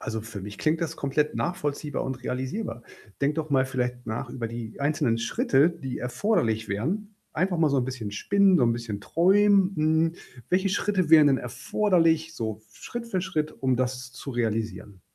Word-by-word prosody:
Also 110 0 -4
für 110 -2 -8
mich 100 +1 -8
klingt 155 - +1
das 165 -1 -3
komplett 150 +2 0
nachvollziehbar 150 -4 -2
und 130 -1 -5
realisierbar. 130 - -3 0.4
Denk 140 +1 +2
doch 155 -1 -3
mal 135 -1 +3
vielleicht 125 -1 -3
nach 110 0 -4
über 115 -3 -4
die 115 0 -7
einzelnen 140 -5 +1
Schritte, 135 +6 +3
die 150 -7 -6
erforderlich 120 - 0
wären. 190 - -2 0.2
Einfach 180 +1 0
mal 160 -2 +4
so 140 - +1
'n 130 - +2
bisschen 125 -5 -5
spinnen, 200 - +3
so 125 - +4
'n 115 - +3
bisschen 115 -4 -5
träumen, 195 - +4
hm. 160 +1 +2 0.4
Welche 190 +2 +2
Schritte 190 -4 0
wären 155 -2 +8
denn 135 -2 +4
erforderlich, 165 - +1
so 110 -4 -4
Schritt 240 - -7
für 190 -4 -1
Schritt, 155 -5 -2
um 130 -2 0
das 125 0 -2
zu 130 +2 -8
realisieren? 110 -5 -3
140 Hz, 180 wpm, -26 LUFS, 120-170 Hz, 0.4 s, wären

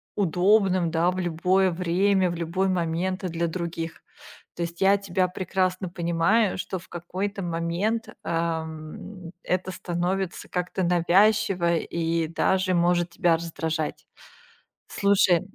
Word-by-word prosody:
удобным, 185 -1 +3
да, 170 +2 +2
в 185 - -4
любое 180 +2 +2
время, 180 +2 +2
в - - -4
любой 175 +3 -1
момент 180 +2 -1
и - - -1
для 170 0 -1
других. 165 -1 -5 0.5
То 175 - -2
есть 170 +2 -6
я 195 +1 +5
тебя 185 -2 0
прекрасно 185 0 -1
понимаю, 175 +5 +1
что 185 0 -4
в 185 - -16
какой-то 190 +3 -4
момент, 175 +7 -1
эм, 165 +2 -4
это 185 +1 -1
становится 180 +1 -3
как-то 180 +1 -2
навязчиво 180 0 +3
и 165 0 -1
даже 185 +3 +1
может 175 0 +2
тебя 170 -1 +3
раздражать. 160 -1 -3 0.8
Слушай, 195 -4 +3
175 Hz, 125 wpm, -25 LUFS, 170-190 Hz, 0.8 s, я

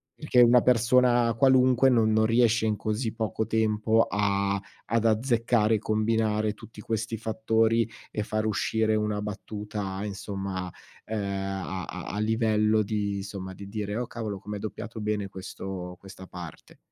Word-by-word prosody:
Perché 140 -5 +3
una 120 0 +7
persona 120 0 +4
qualunque 130 +1 +4
non 115 -3 +3
non 110 0 +3
riesce 115 -1 +3
in 105 - +1
così 110 +3 -2
poco 110 -1 -2
tempo 110 0 +2
a 100 -1 0 0.2
ad 115 +1 0
azzeccare, 115 -1 +2
combinare 110 0 +1
tutti 110 0 -12
questi 110 +1 -3
fattori 110 +1 +1 0.2
e 105 - -2
far 110 0 -2
uscire 110 +1 +1
una 105 -1 -1
battuta, 105 -1 -5
insomma, 95 -2 -4 0.3
ehm, 110 0 -3
a 95 -2 -3
a 90 -1 -7
a 105 - -2
livello 110 -1 +2
di 100 -1 -2
insomma, 95 -1 -6
di 100 +1 -9
dire: 105 +1 -4
"Oh 125 - -1
cavolo, 110 -4 -5
com'è 105 +1 -6
doppiato 110 +1 -6
bene 105 -2 -2
questo 95 -1 -7
questa 95 -1 -12
parte." 90 -4 -10
110 Hz, 145 wpm, -27 LUFS, 100-115 Hz, 0.3 s, una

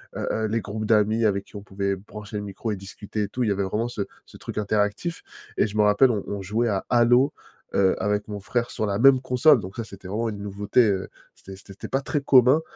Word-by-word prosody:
heu, - - -3
heu, 110 - -1
les 110 +2 -1
groupes 110 +1 -5
d'amis 110 +1 +3
avec 100 -2 +1
qui - - -19
on 100 - -7
pouvait 100 0 -2
brancher 105 +2 -9
le 105 - -4
micro 105 +3 -5
et - - -1
discuter 100 +2 -5
et 100 - -2
tout. 125 - -4
Il 110 - +1
y - - +2
avait 100 0 0
vraiment 105 +5 -1
ce 120 - -5 0.3
ce - - -14
truc - - -8
interactif. 105 - -1 0.3
Et - - +3
je 105 - -6
me - - +4
rappelle, 105 +5 +5
on 105 -4 -2
on 100 -1 -4
jouait 110 +5 0
à 95 -2 -1
Halo, 125 +3 +4 0.4
heu, 95 -1 +3
avec 105 +1 -1
mon 105 -1 -5
frère 120 +4 -2
sur 110 - -2
la 100 0 -1
même 135 0 +6
console. 130 +2 +4
Donc 95 0 -8
ça, 115 - -2
c'était 100 -3 -11
vraiment 110 +4 -2
une 105 - -6
nouveauté, 105 +4 +1
heu, 95 -1 -1 0.3
c'était 95 - -12
c'était 95 +1 -13
té - - -8
pas 135 +1 -1
très 145 +1 -2
commun, 130 +2 +5
105 Hz, 255 wpm, -24 LUFS, 100-120 Hz, 0.4 s, même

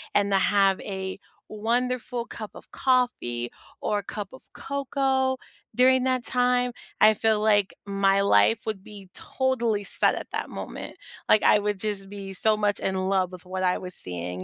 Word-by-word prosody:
and 200 0 +2
to 195 - +4
have 195 -1 +3
a 190 -1 -5 0.3
wonderful 240 +2 -1
cup 215 -3 -8
of - - -14
coffee, 245 - 0 0.3
or 210 - 0
a 205 - -8
cup 205 -1 -6
of 260 - -12
cocoa 270 -1 -1 0.4
during 255 +1 +5
that 255 -1 +1
time, 250 0 +2 0.3
I 215 0 +8
feel 220 0 +2
like 205 -2 +2
my 195 0 +2
life 105 - +4
would 215 -4 -4
be 200 -3 -12
totally 235 -6 -1
set - - +2
at - - -6
that - - -3
moment, - - -7 0.3
like, 215 - +5
I 210 - +6
would 205 -1 -2
just 195 -2 -2
be 195 -1 -7
so 215 +3 +3
much 205 -1 0
in 190 - -1
love 185 -1 0
with 180 0 -11
what 185 +1 -4
I 180 0 +2
was 180 0 -6
seeing, 90 - -4
205 Hz, 175 wpm, -26 LUFS, 190-245 Hz, 0.4 s, I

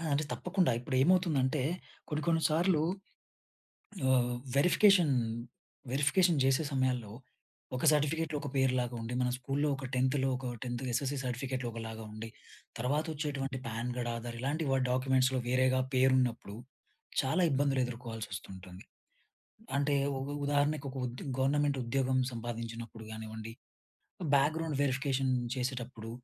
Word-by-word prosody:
ఆ! - - -6
అంటే 145 +2 +2
తప్పకుండా 180 -4 +1
ఇప్పుడేంమవుతుందంటే 140 0 +2 0.5
కొన్ని 150 -1 -2
కొన్ని 165 -1 +3
సార్లు 160 0 +3 1.3
ఆహ్, 125 -1 +3 0.2
వెరిఫికేషన్ 175 -1 +5 0.8
వెరిఫికేషన్ 150 +4 +3
జేసే 135 +4 +3
సమయాల్లో 125 -5 0 0.6
ఒక 125 - -3
సర్టిఫికేట్‌లో 155 +1 +1
ఒక 145 - -4
పేరు 130 -1 +3
లాగుండి. 120 -1 -4
మన 125 - +2
స్కూలులో 135 +3 -1
ఒక 135 - -8
10త్ 130 +2 +2
లో 135 - +2
ఒక 130 0 -6 0.2
10త్ 120 0 -3
ఎస్ఎస్‌సీ 135 +3 0
సర్టిఫికేట్‌లో 130 0 -3
ఒకలాగుండి. 110 -1 -7 0.5
తర్వాత 140 +6 0
వచ్చేటువంటి 140 -3 -3
పాన్ 115 +2 -3
కార్డ్ 120 -1 -2
ఆధార్ 115 0 -5
ఇలాంటి 145 +5 -1 0.3
డాక్యుమెంట్స్‌లో 130 0 +2
వేరేగా 130 +1 +3
పేరున్నప్పుడు 130 -5 +2 0.7
చాలా 135 +8 +1
ఇబ్బందులు 140 0 +2
ఎదుర్కోవాల్సొస్తుంటుంది. 100 -6 -7 0.9
అంటే 145 +1 +2 0.2
ఉ - - -4 0.2
ఉదాహరణకు 145 0 +1
ఒక 135 - -9
ఉద్ 120 +1 -7 0.2
గవర్నమెంట్ 145 +1 +2
ఉద్యోగం 130 +2 +1 0.2
సంపాదించినప్పుడు 115 -1 -6
గానివ్వండి, 110 0 -7 0.8
బ్యాక్‌గ్రౌండ్ 155 +2 +1
వెరిఫికేషన్ 135 -1 +1 0.2
చేసేటప్పుడు, 125 -3 -4
130 Hz, 115 wpm, -32 LUFS, 120-145 Hz, 1.3 s, వెరిఫికేషన్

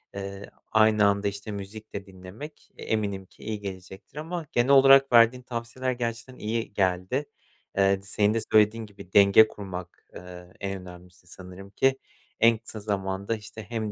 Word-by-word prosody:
eee, 100 0 -7 0.2
aynı 110 -1 +4
anda, 100 0 +2
işte, 100 +2 -5
müzik 105 +2 -8
de 100 -1 -5
dinlemek, 95 +10 -11
eee, - - -9
eminim 100 -3 -2
ki - - -19
iyi 110 -1 -4
gelecektir 95 +6 -9
ama 165 +2 -5
genel 120 +2 +1
olarak 135 0 +7
verdiğin 120 +2 +5
tavsiyeler 120 +2 -4
gerçekten 120 +1 -4
iyi 110 0 -3
geldi. 95 +8 0 0.5
Eee, 100 0 +3
t - - -18
senin 105 +1 +1
de 115 - +1
söylediğin 110 +1 +4
gibi, 100 -3 -14
denge 100 +2 +7
kurmak, 95 -4 -9
eee, 90 0 -11
en 95 -1 -4
önemlisi 90 0 -14
sanırım 90 +2 -11
ki. 135 +6 +1 0.4
En 115 0 +5
kısa 110 0 -8
zamanda, 100 0 -2
işte, 110 0 -10
hem 110 0 -4
105 Hz, 165 wpm, -26 LUFS, 95-115 Hz, 0.5 s, olarak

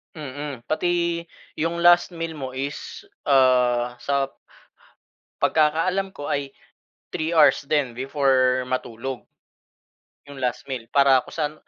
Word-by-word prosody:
Mm, 145 -3 -7
pati 170 +1 0 0.4
yung 170 +2 -1
last 175 0 +5
meal 165 0 -4
mo 130 -2 -6
is, 140 +2 -5 0.2
ah, 125 -3 +3
sa 140 -1 -1 1.1
pagkakaalam 165 +5 +1
ko 145 - -5
ay 140 -1 -3 0.6
3 160 +1 -2
hours 150 -4 +5
din 145 -5 +1
before 130 -1 +2
matulog 125 0 -4 1.1
'yong 140 - -10
last 125 0 -3
meal. 125 -4 -4
Para 135 -2 +5
kung - - -12
saan, 150 -2 -2
140 Hz, 120 wpm, -23 LUFS, 130-160 Hz, 1.1 s, last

